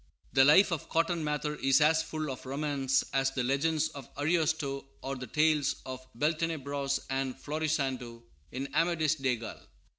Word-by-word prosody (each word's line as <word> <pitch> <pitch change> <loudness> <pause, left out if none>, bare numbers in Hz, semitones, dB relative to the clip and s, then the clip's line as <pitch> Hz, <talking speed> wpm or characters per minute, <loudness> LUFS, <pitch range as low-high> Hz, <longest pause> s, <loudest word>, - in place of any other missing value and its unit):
The 135 - +6
life 165 +8 +6
of 165 - -3
Cotton 165 0 +1
Mather 150 0 -2
is 135 +2 +4
as 160 +1 +4
full 155 -2 -4
of 130 0 -8
romance 135 -1 0
as 135 -1 +2
the 135 -2 -2
legends 155 +4 +1
of 140 -5 -10
Ariosto 155 -3 0 0.2
or 135 +1 -3
the 125 -1 -7
tales 155 -2 +2
of 130 0 -6
Beltenebros 145 -1 -1
and 135 -1 -1
Florisando 135 -6 -2 0.3
in 135 +2 -4
Amadis 160 -1 +2
de 135 -4 0
Gaul. 115 0 -8
145 Hz, 155 wpm, -30 LUFS, 135-155 Hz, 0.3 s, The